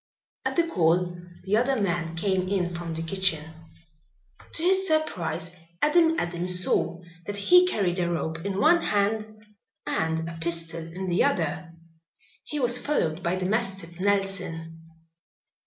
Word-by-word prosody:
At - - -1
the 340 - +3
call 175 - +1 0.3
the 200 +3 +2
other 255 +2 +1
man 170 -4 -1
came 185 +1 0
in 185 -3 0
from 170 -1 -5
the 165 - -3
kitchen. 165 -3 0 1.0
To 325 - -1
his 380 +2 +3
surprise 180 - 0 0.2
Adam 325 +1 +4
Adams 180 +1 -1
saw 170 0 0 0.2
that 205 0 -4
he 360 - +6
carried 190 - 0
a 175 -1 +1
rope 160 0 -3
in 200 -1 -2
one 340 +6 +5
hand 215 0 -1 0.4
and 160 0 -1
a 165 0 -7
pistol 165 0 -2
in 165 +4 -6
the 175 -1 +2
other. 165 +1 -1 0.7
He 300 - -4
was 245 -1 +4
followed 175 - 0
by 170 +1 0
the 185 0 -3
mastiff 190 -5 -2
Nelson. 190 -5 -1
180 Hz, 145 wpm, -26 LUFS, 165-215 Hz, 1.0 s, he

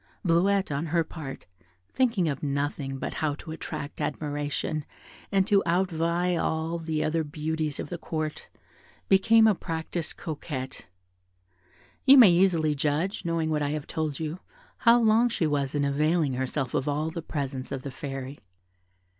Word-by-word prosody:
Bleuette, 190 +2 +2
on 145 +4 -2
her 165 +1 +2
part, 155 -4 -8 0.4
thinking 225 - +1
of 140 -3 -2
nothing 140 -1 -2
but - - -4
how 150 -2 -1
to 155 - -9
attract 150 -2 -6
admiration 145 +1 -2 0.5
and 195 -2 +3
to 200 -1 +4
outvie 175 0 +1
all 160 +1 -1
the 160 -1 -1
other 160 +1 0
beauties 155 0 -3
of - - -5
the 175 - -5
Court, 155 -2 -4 0.6
became 220 +4 +6
a 215 - +6
practised 165 -2 -4
coquette. 140 -4 -6 1.2
You 275 +1 +8
may 230 -8 +9
easily 170 -4 +3
judge, 150 +7 -1
knowing 165 -1 0
what 150 -1 0
I 145 - 0
have 150 -1 -4
told 155 -3 -3
you, 160 +2 -4 0.4
how 235 0 +5
long 230 +1 +4
she 200 -7 0
was 145 -2 0
in 145 -1 +1
availing 150 +1 +1
herself 130 0 -2
of 135 - 0
all 150 +2 -1
the 170 0 -5
presents 140 -5 -4
of 135 -2 -4
the 140 - -5
Fairy. 135 0 -6
155 Hz, 155 wpm, -27 LUFS, 145-175 Hz, 1.2 s, may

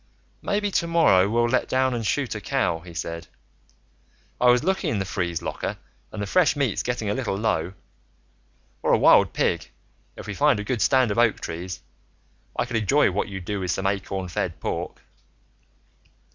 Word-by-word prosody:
"Maybe 205 0 -1
tomorrow, 165 - +3
we'll 120 +2 +2
let 125 +2 0
down 130 0 +2
and 120 -1 -2
shoot 105 - -1
a - - -6
cow," 80 - 0
he 85 0 -13
said. 85 0 -5 1.1
"I 125 - +5
was 125 +2 +4
looking 190 +2 0
in 110 - -1
the 95 - -1
freeze 85 -3 -3
locker - - -4 0.3
and 110 - -7
the 100 - -2
fresh 175 - +3
meat's 140 -8 0
getting 120 -3 -3
a - - +1
little 110 -5 -2
low. 95 -5 -1 1.1
Or - - +2
a - - +6
wild - - +5
pig, - - -1 0.5
if - - -8
we 105 - -5
find 145 +2 +3
a - - -3
good 115 +1 -2
stand 130 -5 +3
of 100 - 0
oak 120 -2 +3
trees. 90 +2 -6 0.8
I - - +1
could 120 -2 -2
enjoy 115 +2 +3
what 95 - -1
you'd 95 -3 -7
do 105 +1 -2
with 90 -1 -3
some 95 - -1
acorn 95 -1 -2
fed 85 - -3
pork." - - -4
105 Hz, 185 wpm, -24 LUFS, 95-130 Hz, 1.1 s, a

